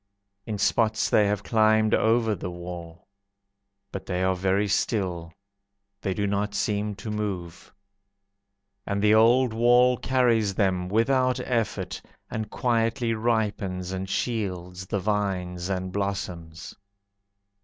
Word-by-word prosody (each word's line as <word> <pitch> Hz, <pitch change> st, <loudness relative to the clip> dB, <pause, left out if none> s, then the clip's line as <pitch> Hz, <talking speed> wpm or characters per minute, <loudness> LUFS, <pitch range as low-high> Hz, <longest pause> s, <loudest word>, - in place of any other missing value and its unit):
In 110 Hz, -2 st, -3 dB
spots 110 Hz, +2 st, +1 dB
they 105 Hz, -, +4 dB
have 100 Hz, -1 st, -1 dB
climbed 110 Hz, -1 st, +3 dB
over 115 Hz, 0 st, +3 dB
the 90 Hz, -2 st, -5 dB
wall. 85 Hz, -1 st, -9 dB, 0.8 s
But -, -, -7 dB
they 90 Hz, -1 st, -1 dB
are 95 Hz, 0 st, +2 dB
very 95 Hz, +3 st, +1 dB
still, 90 Hz, -5 st, -1 dB, 0.7 s
They 95 Hz, -3 st, -2 dB
do 100 Hz, -, 0 dB
not 100 Hz, +1 st, -1 dB
seem 105 Hz, 0 st, -1 dB
to 105 Hz, +2 st, -6 dB
move. 95 Hz, -5 st, -5 dB, 1.2 s
And 100 Hz, 0 st, -1 dB
the 105 Hz, 0 st, +5 dB
old 115 Hz, +2 st, +5 dB
wall 120 Hz, +2 st, +4 dB
carries 115 Hz, -7 st, +2 dB
them 90 Hz, -3 st, 0 dB
Without 130 Hz, +4 st, +2 dB
effort, 120 Hz, -4 st, -2 dB, 0.3 s
and 110 Hz, -1 st, -3 dB
quietly 115 Hz, 0 st, 0 dB
Ripens 105 Hz, -5 st, -1 dB
and 95 Hz, 0 st, -4 dB
shields 95 Hz, -6 st, -3 dB
the 100 Hz, -, -1 dB
vines 95 Hz, -3 st, -2 dB
and 95 Hz, -1 st, -2 dB
blossoms. 95 Hz, -2 st, -4 dB
105 Hz, 120 wpm, -26 LUFS, 95-110 Hz, 1.2 s, the